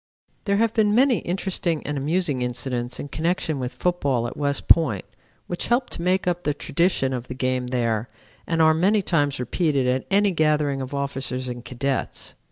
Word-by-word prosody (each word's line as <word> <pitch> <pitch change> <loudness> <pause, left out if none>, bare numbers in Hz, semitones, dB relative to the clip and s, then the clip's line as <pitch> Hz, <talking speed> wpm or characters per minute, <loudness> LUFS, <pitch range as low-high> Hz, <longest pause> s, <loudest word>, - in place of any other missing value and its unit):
"There 200 -2 +2
have 225 +1 +2
been 210 -2 +3
many 255 -1 +4
interesting 175 -3 -2
and 145 - -2
amusing 145 -1 0
incidents 125 0 -3
in 145 - -5
connection 160 -1 -1
with 125 -1 -3
football 140 -9 0
at 120 - -5
West 140 -1 -1
Point 140 - +4 0.4
which 175 - -4
help 245 +2 +1
to - - -4
make 185 +2 +1
up 175 -1 0
the 150 -4 -1
tradition 145 -4 0
of 125 -1 -4
the 130 - -6
game 130 -1 -1
there 115 -2 -1 0.4
and 165 -1 +2
are 160 0 +6
many 195 +6 +2
times 145 -6 +1
repeated 140 +2 0
at 125 +1 0
any 200 +1 +3
gathering 150 -4 +1
of 130 +2 -5
officers 135 -2 -3
and 120 -1 -6
cadets. 135 +2 -3
145 Hz, 180 wpm, -24 LUFS, 130-180 Hz, 0.4 s, are